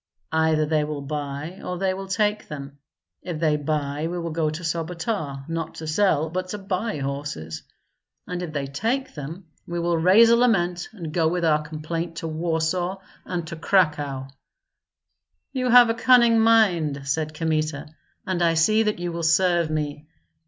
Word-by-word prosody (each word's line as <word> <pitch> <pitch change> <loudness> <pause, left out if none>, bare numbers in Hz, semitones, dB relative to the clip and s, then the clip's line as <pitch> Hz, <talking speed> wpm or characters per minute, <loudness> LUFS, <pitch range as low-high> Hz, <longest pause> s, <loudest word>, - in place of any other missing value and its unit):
"Either 160 -1 +2
they 155 0 +1
will 150 -1 -4
buy 145 +4 -5
or 180 - -4
they 190 +1 0
will 195 +1 -6
take 210 +1 0
them. 140 -1 -8 0.4
If 170 -4 -5
they 155 -2 +2
buy 150 0 -2
we 175 +1 -4
will 170 -1 -3
go 155 -1 0
to 155 +4 -6
Sobota, 165 -3 -3
not 165 -1 -4
to 160 - -7
sell, 160 -2 +1
but 185 +1 -2
to 210 - -4
buy 195 0 -2
horses; 140 - -4 0.6
and 180 0 -4
if 175 -3 -5
they 145 -2 -2
take 225 - -2
them, 160 +5 -7 0.2
we 170 0 -3
will 170 -1 +1
raise 200 +7 +6
a - - +7
lament 180 -8 +1
and 170 -8 -7
go 165 -1 +2
with 175 +1 0
our 155 -1 +3
complaint 165 +2 -5
to 165 - -4
Warsaw 165 +3 -1 0.3
and 175 -2 -3
to 165 - -6
Cracow." 145 -6 +1 1.2
"You 255 -1 0
have 240 -1 +8
a - - 0
cunning 235 -1 +5
mind," 185 -11 +3
said 155 +2 -1
Kmita, 155 -2 -1 0.4
"and 185 -2 -1
I 165 -1 +3
see 215 +8 +4
that 210 -1 0
you 175 0 -3
will 170 0 -4
serve 170 0 +3
me. 150 -1 -3
165 Hz, 175 wpm, -24 LUFS, 150-185 Hz, 1.2 s, have